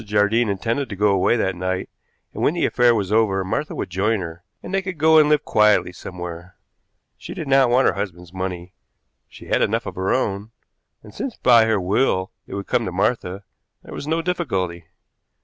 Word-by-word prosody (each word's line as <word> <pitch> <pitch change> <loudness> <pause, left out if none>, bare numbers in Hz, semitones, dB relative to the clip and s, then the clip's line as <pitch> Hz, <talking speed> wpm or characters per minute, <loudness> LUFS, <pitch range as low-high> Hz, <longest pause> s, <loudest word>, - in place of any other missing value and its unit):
Jardine 105 +2 +2
intended 115 +7 -2
to 100 - -5
go 105 +2 +2
away 100 +4 +2
that 95 -4 0
night, 95 +1 -3 0.5
and - - -6
when 155 - +2
the 175 - +1
affair 120 -1 +3
was 100 -3 -2
over 105 -3 +2
Martha 145 +11 -3
would - - -5
join 105 +4 +1
her, 85 0 -8 0.2
and 185 - -7
they 195 - +2
could 185 -2 -6
go 160 +1 +5
and 150 -1 +4
live 150 -1 +2
quietly 105 -4 +3
somewhere. 90 -1 -8 0.6
She - - -8
did 155 - -5
not 135 -2 +4
want 125 +2 +4
her - - +2
husband's 90 -3 -6
money 95 -1 -5 0.6
she - - -13
had - - +1
enough - - 0
of - - -5
her 95 +1 -2
own, 105 -3 -1 0.5
and, 105 - -14
since 255 - -5
by 120 -3 +5
her 110 -2 +1
will 95 0 0 0.2
it - - -7
would 100 -1 -4
come 120 - 0
to 90 - -3
Martha, 95 0 -1 0.4
there - - -11
was 145 - -6
no 165 +1 0
difficulty. 95 - -2
105 Hz, 200 wpm, -21 LUFS, 95-125 Hz, 0.6 s, go